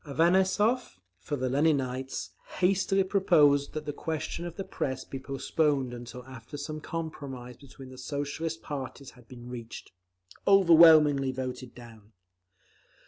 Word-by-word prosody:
Avanessov, 190 Hz, -, +2 dB, 0.2 s
for 145 Hz, -, -4 dB
the 130 Hz, -2 st, -2 dB
Leninites, 135 Hz, -2 st, 0 dB, 0.3 s
hastily 195 Hz, +1 st, +2 dB
proposed 150 Hz, -7 st, +3 dB
that 155 Hz, -1 st, -5 dB
the 145 Hz, -, -3 dB
question 160 Hz, +3 st, -4 dB
of 170 Hz, -, -9 dB
the 195 Hz, -, -4 dB
Press 130 Hz, -7 st, -4 dB
be 135 Hz, -, -7 dB
postponed 135 Hz, 0 st, -1 dB
until 120 Hz, +1 st, -9 dB
after 130 Hz, +1 st, -10 dB
some 155 Hz, +2 st, -6 dB
compromise 140 Hz, -7 st, -6 dB
between 135 Hz, -1 st, -13 dB
the 130 Hz, 0 st, -12 dB
Socialist 145 Hz, +4 st, -4 dB
parties 140 Hz, -2 st, -6 dB
had 125 Hz, -2 st, -20 dB
been 120 Hz, -1 st, -11 dB
reached. 120 Hz, -2 st, -8 dB, 0.6 s
Overwhelmingly 160 Hz, -7 st, +6 dB
voted 130 Hz, -1 st, -6 dB
down. 115 Hz, -3 st, -14 dB
140 Hz, 130 wpm, -28 LUFS, 130-165 Hz, 0.6 s, Overwhelmingly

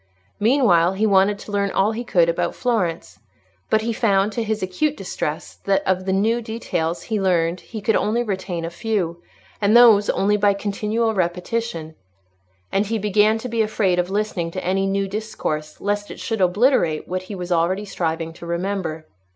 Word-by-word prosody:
Meanwhile, 210 Hz, -8 st, +4 dB
he 205 Hz, +3 st, 0 dB
wanted 200 Hz, 0 st, +3 dB
to 205 Hz, -, -10 dB
learn 200 Hz, -1 st, 0 dB
all 195 Hz, +2 st, +2 dB
he 230 Hz, +2 st, -4 dB
could 175 Hz, -7 st, +3 dB
about 170 Hz, -, -1 dB
Florence. 170 Hz, -, -2 dB, 0.5 s
But 220 Hz, -, +3 dB
he 230 Hz, 0 st, -1 dB
found, 205 Hz, -3 st, +2 dB
to 230 Hz, -, -2 dB
his 220 Hz, -2 st, -2 dB
acute 285 Hz, +12 st, -1 dB
distress, -, -, -5 dB
that 195 Hz, -1 st, +2 dB
of 185 Hz, 0 st, +1 dB
the 190 Hz, -, 0 dB
new 220 Hz, +5 st, +1 dB
details 180 Hz, -7 st, -3 dB
he 215 Hz, -3 st, -2 dB
learned 175 Hz, -2 st, +1 dB
he 220 Hz, +3 st, -8 dB
could 215 Hz, +2 st, +1 dB
only 230 Hz, +3 st, +1 dB
retain 185 Hz, -5 st, -3 dB
a 165 Hz, -, -5 dB
few, 175 Hz, -3 st, -2 dB, 0.4 s
and 210 Hz, +3 st, +5 dB
those 220 Hz, -4 st, +7 dB
only 205 Hz, +1 st, +2 dB
by 200 Hz, -1 st, +3 dB
continual 215 Hz, +3 st, -1 dB
repetition; 180 Hz, -2 st, -2 dB, 0.8 s
and 195 Hz, +1 st, +1 dB
he 225 Hz, +2 st, -1 dB
began 210 Hz, +1 st, +3 dB
to 225 Hz, -, -6 dB
be 230 Hz, -2 st, 0 dB
afraid 205 Hz, -4 st, +1 dB
of 180 Hz, +1 st, 0 dB
listening 200 Hz, -4 st, -1 dB
to 185 Hz, +2 st, -6 dB
any 195 Hz, +2 st, +1 dB
new 195 Hz, 0 st, 0 dB
discourse, 190 Hz, -7 st, -4 dB
lest 205 Hz, +1 st, -2 dB
it -, -, -9 dB
should 225 Hz, -3 st, -2 dB
obliterate 185 Hz, -, +2 dB
what 185 Hz, +1 st, -2 dB
he 190 Hz, +2 st, -8 dB
was 180 Hz, -1 st, -6 dB
already 175 Hz, +4 st, +1 dB
striving 165 Hz, -4 st, -3 dB
to 170 Hz, -, -10 dB
remember. 170 Hz, -2 st, -3 dB
195 Hz, 185 wpm, -22 LUFS, 175-220 Hz, 0.8 s, those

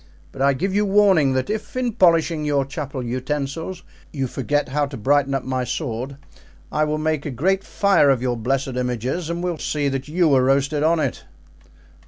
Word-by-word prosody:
But 135 Hz, -, -8 dB
I 140 Hz, +1 st, +4 dB
give 190 Hz, +9 st, -2 dB
you 205 Hz, +1 st, +2 dB
warning 195 Hz, -9 st, +4 dB
that 130 Hz, 0 st, 0 dB
if 215 Hz, +3 st, -5 dB
in 250 Hz, -2 st, 0 dB
polishing 165 Hz, -5 st, +3 dB
your 145 Hz, -2 st, +1 dB
chapel 140 Hz, -2 st, -5 dB
utensils 140 Hz, +8 st, -3 dB, 0.3 s
you 135 Hz, -3 st, -2 dB
forget 145 Hz, +3 st, -1 dB
how 145 Hz, +2 st, 0 dB
to 140 Hz, -, -8 dB
brighten 140 Hz, +4 st, +2 dB
up 135 Hz, -, -2 dB
my 130 Hz, -1 st, -2 dB
sword, 125 Hz, 0 st, -4 dB, 0.5 s
I 155 Hz, 0 st, +1 dB
will 150 Hz, 0 st, -1 dB
make 155 Hz, -1 st, -1 dB
a -, -, -4 dB
great 185 Hz, +10 st, 0 dB
fire 200 Hz, -8 st, +3 dB
of 135 Hz, -3 st, +3 dB
your 125 Hz, 0 st, -1 dB
blessed 135 Hz, +4 st, -1 dB
images 125 Hz, +6 st, -2 dB
and 170 Hz, +1 st, -3 dB
will 175 Hz, -3 st, -2 dB
see 145 Hz, -2 st, -1 dB
that 135 Hz, 0 st, -4 dB
you 160 Hz, -1 st, +2 dB
are 130 Hz, -1 st, +4 dB
roasted 140 Hz, +2 st, +2 dB
on 160 Hz, +2 st, +3 dB
it." 140 Hz, -5 st, -2 dB
145 Hz, 195 wpm, -22 LUFS, 130-165 Hz, 0.5 s, I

